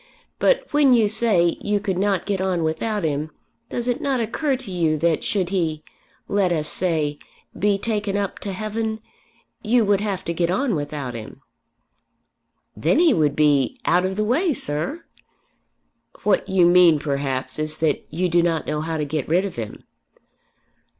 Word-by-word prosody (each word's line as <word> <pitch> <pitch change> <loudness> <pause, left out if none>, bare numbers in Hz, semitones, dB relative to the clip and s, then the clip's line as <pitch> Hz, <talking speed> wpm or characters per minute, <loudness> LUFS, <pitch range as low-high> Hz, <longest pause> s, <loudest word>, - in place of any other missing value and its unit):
But - - +3
when 290 -3 +5
you 225 -3 +4
say 205 -6 +2
you 205 0 0
could 190 -2 -2
not 195 -3 0
get 200 -2 -1
on 185 -3 0
without 200 +6 -1
him, 150 0 -1 0.4
does 240 0 -3
it 245 - -1
not 270 -3 0
occur 265 +5 0
to 250 -7 -9
you 165 -4 +1
that 165 0 +1
should 190 -4 0
he, 160 -5 -1 0.4
let 200 -3 +1
us 155 -3 -1
say 155 -5 -1 0.4
be 205 0 +1
taken 205 -1 -1
up 200 -1 -3
to 200 - -5
heaven, 220 +2 -3 0.6
you 230 +1 +2
would 200 -1 +2
have 200 -3 -3
to 170 - -2
get 170 0 0
on 240 +6 0
without 145 -4 -4
him." 115 -2 -9 1.3
"Then 165 - +1
he 330 -3 +5
would 150 -4 +1
be, 150 - +2
out 175 +2 +3
of 190 +1 -1
the 215 - 0
way, 300 - +1
sir." 165 - -4 1.2
"What 205 -2 +1
you 190 -2 +4
mean 175 -2 +6
perhaps 140 -2 -2
is 155 0 -1
that 160 -2 0
you 180 +4 -1
do 175 0 +3
not 165 -2 0
know 150 - -2
how 160 0 -3
to 150 - -1
get 150 -1 -3
rid 180 +4 +2
of 195 - -6
him." 110 -3 -6
180 Hz, 175 wpm, -22 LUFS, 155-210 Hz, 1.3 s, mean